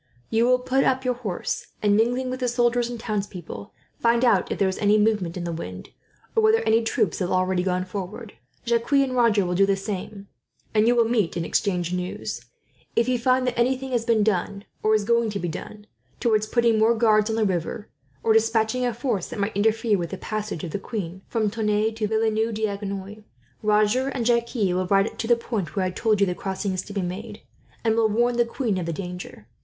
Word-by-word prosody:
You 225 +1 +3
will 255 0 +5
put 260 +2 +1
up 260 0 +1
your 250 - +2
horse 220 -7 -4 0.2
and, 205 -1 +4
mingling 245 +4 +1
with 255 - -4
the 250 - 0
soldiers 240 0 +1
and 240 -1 -6
townspeople, 195 - -5 0.3
find 235 +1 +3
out 200 -7 +3
if - - -1
there 195 - +2
is 190 - -3
any 210 0 +4
movement 210 -5 +1
in 175 - -4
the 170 - -3
wind, 90 - -7 0.5
or 450 - +4
whether 440 +1 +4
any 225 +1 +3
troops 220 - 0
have 180 -2 -1
already 185 0 +1
gone 185 0 -1
forward. 200 +4 -6 0.3
Jacques 235 +3 0
and 275 -2 +3
Roger 225 -5 +3
will 180 - -1
do 195 +2 +3
the 195 - +3
same, 195 0 -6 0.5
and 215 0 +3
you 240 - +4
will 235 -1 +4
meet 220 -7 0
and 165 - -2
exchange 180 -3 0
news. 180 0 -4 0.5
If 230 - +2
you 250 -1 +1
find 255 +2 +2
that 250 -1 -1
anything 260 +2 0
has 240 -2 +1
been 230 -2 +2
done, 200 0 -1 0.2
or 215 0 +3
is 215 - +1
going 235 +1 +2
to 205 -1 -3
be 175 - -2
done, 205 +5 -7 0.3
towards 215 -2 +2
putting 235 -2 +2
more 225 +2 +4
guards 215 -1 +3
on 220 - 0
the 220 -1 +2
river, 185 +2 -2 0.4
or 225 - +4
despatching 225 +2 +2
a 245 -3 0
force 230 -7 -2
that - - -7
might 200 +1 -1
interfere 220 0 +2
with 170 -1 -3
the 195 - -5
passage 215 -5 -4
of 170 - -4
the 200 - -3
queen 190 -4 -5
from 215 -3 0
Tonneins 215 0 0
to 215 - +1
Villeneuve 220 +1 0
d'Agenois, 200 -1 -4 0.4
Roger 215 +5 +2
and 260 -4 -2
Jacques 235 +1 +1
will 185 -5 +1
ride 195 +2 +1
to 225 - -2
the 240 - +5
point 210 - -4
where 190 - +1
I 185 - -1
told 215 +2 +1
you 200 - +5
the 180 - -1
crossing 190 +2 -3
is 185 - -2
to 205 - -9
be 200 -2 -1
made, 210 +5 -6 0.4
and 225 -1 +3
will 225 -1 +3
warn 240 +3 +1
the 240 - +4
queen 230 -5 -2
of 170 - -4
the 170 - -2
danger. 180 - -7
215 Hz, 225 wpm, -24 LUFS, 195-235 Hz, 0.5 s, will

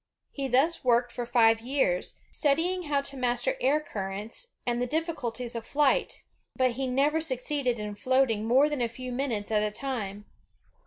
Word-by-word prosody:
He 275 -1 -3
thus 275 +7 +2
worked 245 -1 +3
for 240 -1 -4
five 225 -2 +4
years, 240 -8 0 0.2
studying 340 +5 +1
how 285 -2 +1
to 280 0 -6
master 245 -2 0
air 275 +4 +3
currents 210 - -5 0.2
and 240 0 0
the 250 - 0
diffi 325 +5 -1
culties 240 -3 -4
of 230 - -4
flight; 285 +2 +1 0.3
but 255 -1 +2
he 260 +2 -3
never 285 +5 +2
succeeded 260 -3 -1
in 210 -1 -4
floating 240 -1 +1
more 265 +5 +5
than 295 -4 -2
a 235 - +1
few 255 +2 -7
minutes 245 -5 -2
at 210 -1 +3
a 210 - +1
time. 210 -4 -4
250 Hz, 175 wpm, -28 LUFS, 230-280 Hz, 0.3 s, more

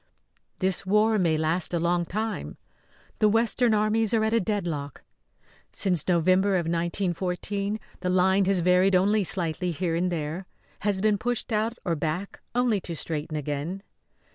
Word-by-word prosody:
This 190 -1 0
war 210 +3 +3
may 165 -4 +2
last 160 +3 0
a - - +1
long 175 +1 +1
time; 215 +4 -4 0.6
the 215 - +5
western 225 +1 +2
armies 215 +1 +2
are 220 - +2
at 220 +1 +1
a 230 - +4
deadlock. 170 - -3 0.7
Since 180 -6 0
November 185 +3 +3
of 175 -2 0
1914 180 +4 -2 0.2
the 180 - -2
line 190 +2 +3
has 190 -2 +3
varied 180 +2 +4
only 205 +3 +3
slightly 180 -1 -1
here 170 0 -2
and 180 +2 0
there; 165 +3 -4 0.3
has 200 -2 -1
been 210 -1 +2
pushed 245 0 -2
out 220 +2 0
or 170 -3 +1
back 160 +6 -4
only 240 -5 +2
to 170 - -5
straighten 155 +1 -3
again. 150 +6 -4
185 Hz, 155 wpm, -26 LUFS, 170-210 Hz, 0.7 s, the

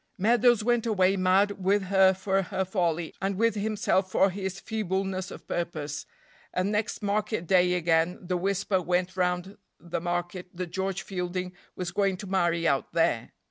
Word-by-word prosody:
Meadows 235 +2 +4
went 240 0 +1
away 195 -3 +3
mad 190 +1 +2
with 200 +2 +3
her 190 0 +4
for 190 +1 0
her 190 +1 -2
folly, 175 -4 -1
and 195 0 -1
with 230 +3 +2
himself 205 -2 0
for 195 +1 +3
his 190 0 -4
feebleness 190 -3 -2
of - - -11
purpose, 155 -4 -4 0.4
and 185 +3 0
next 210 0 -2
market 210 -2 -1
day 180 0 +4
again 165 0 +2
the 180 0 -3
whisper 195 +1 0
went 180 +1 0
round 180 +2 -1 0.2
the 170 -1 -4
market 175 +1 -3
that 175 -1 -5
George 190 +1 -2
Fielding 180 -1 -4 0.2
was 180 -1 -4
going 195 0 +1
to 200 - -8
marry 175 -3 +1
out 140 -3 0
there. - - +1
190 Hz, 165 wpm, -27 LUFS, 180-200 Hz, 0.4 s, Meadows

